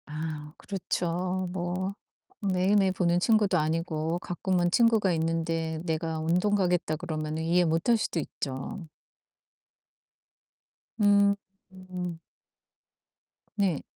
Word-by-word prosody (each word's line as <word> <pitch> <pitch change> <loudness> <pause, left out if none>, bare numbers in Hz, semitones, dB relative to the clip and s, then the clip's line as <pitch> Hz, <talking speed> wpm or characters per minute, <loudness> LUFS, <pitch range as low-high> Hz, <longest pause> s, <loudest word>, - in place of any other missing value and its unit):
아 150 -1 -5
그렇죠 185 -1 -2
뭐. 185 +2 -2 0.5
매일매일 190 +1 +3
보는 175 -1 +2
친구도 205 -3 +3
아니고 160 +1 -1
가끔은 175 0 0
친구가 220 -4 +4
있는데 165 0 -1
내가 160 -1 -1
"운동 180 +6 +2
가겠다." 180 -5 +1
그러면은 155 -1 -3
이해 175 +2 +3
못할 165 +9 +2
수도 190 -5 -1
있죠. 140 +5 -5 2.1
으음. 195 -3 0 1.4
네. 190 -7 +1
175 Hz, 205 characters per minute, -28 LUFS, 160-190 Hz, 2.1 s, 친구가